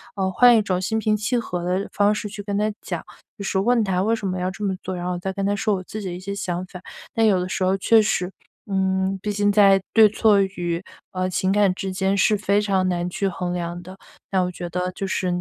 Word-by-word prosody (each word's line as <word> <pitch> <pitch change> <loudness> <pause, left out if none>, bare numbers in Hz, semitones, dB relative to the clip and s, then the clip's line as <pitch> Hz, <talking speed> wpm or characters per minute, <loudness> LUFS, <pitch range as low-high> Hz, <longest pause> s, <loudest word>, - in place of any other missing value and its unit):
呃 190 -2 -1
换 240 +5 +6
一 - - +4
种 185 -2 -1
心 220 +4 -1
平 215 -1 +1
气 215 +4 -1
和 180 -5 -2
地 - - -8
方 205 +1 +3
式 210 - -4
去 205 0 -7
跟 200 0 -3
他 210 +1 +1
讲， - - -5 0.3
就 200 - -6
是 195 0 0
问 235 +3 +3
他， 185 -3 0
“为 220 +4 +2
什 210 -3 -4
么 185 -1 -2
要 180 +1 -1
这 195 +3 -7
么 195 -2 0
做”？ 185 - -4
然 175 - -5
后 180 - -1
我 175 - -4
再 190 +2 -3
跟 195 +1 -3
他 205 +1 +1
说 205 +1 0
我 185 - -5
自 215 +3 -7
己 195 - -5
的 180 - -4
一 - - -7
些 195 +2 -5
想 180 -2 -3
法， 180 0 -11 0.3
但 225 - +1
有 195 -3 +3
的 180 - -2
时 185 - -2
候 190 +1 +2
确 220 +3 +5
实， 185 -3 0 0.3
嗯 190 0 0
毕 210 - -2
竟 205 0 +2
在 200 -1 +6
对 220 -2 +7
错 210 -1 +3
与， 175 -3 -2 0.3
呃 185 0 -2
情 185 +1 0
感 205 -1 +3
之 190 0 -4
间 190 +1 0
是 210 +2 +4
非 200 0 +1
常 195 -3 +1
难 175 -1 -1
去 195 +2 -2
衡 180 -1 -3
量 175 0 -4
的， 185 +2 -12 0.3
那 190 -1 +2
我 180 - 0
觉 175 0 -6
得 180 +1 -2
就 195 - -4
是 190 0 -1
195 Hz, 290 characters per minute, -23 LUFS, 185-205 Hz, 0.3 s, 对